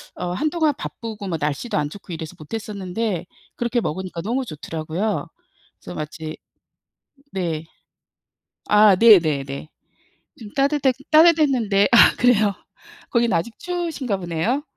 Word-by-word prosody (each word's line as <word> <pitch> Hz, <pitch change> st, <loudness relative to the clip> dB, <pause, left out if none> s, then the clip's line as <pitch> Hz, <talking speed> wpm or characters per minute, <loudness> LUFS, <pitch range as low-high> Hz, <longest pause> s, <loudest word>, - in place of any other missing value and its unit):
어 180 Hz, 0 st, -4 dB
한동안 310 Hz, -, +1 dB
바쁘고 220 Hz, -8 st, -7 dB
뭐 165 Hz, -, -1 dB
날씨도 150 Hz, -, -2 dB
안 150 Hz, -1 st, 0 dB
좋고 195 Hz, +1 st, -11 dB
이래서 160 Hz, -2 st, -6 dB
못 155 Hz, +4 st, -12 dB
했었는데 205 Hz, -3 st, -3 dB, 0.3 s
그렇게 240 Hz, 0 st, 0 dB
먹으니까 185 Hz, -3 st, -4 dB
너무 240 Hz, +8 st, -1 dB
좋더라고요. 165 Hz, -, -3 dB, 0.5 s
그래서 -, -, -9 dB
마치 155 Hz, +1 st, -6 dB, 1.0 s
네. 165 Hz, -5 st, -2 dB, 1.0 s
아 210 Hz, -1 st, +6 dB
네네네. 155 Hz, -10 st, +4 dB, 0.7 s
좀 215 Hz, -3 st, -10 dB
따뜻해 275 Hz, -1 st, +2 dB, 0.2 s
따뜻했는데 280 Hz, -11 st, +4 dB
아 235 Hz, -, +8 dB
그래요? 215 Hz, -5 st, +4 dB, 0.6 s
거긴 235 Hz, -2 st, +2 dB
아직 175 Hz, +7 st, -2 dB
추우신가 330 Hz, -, -3 dB
보네요. 180 Hz, -, -1 dB
205 Hz, 285 characters per minute, -22 LUFS, 165-245 Hz, 1.0 s, 아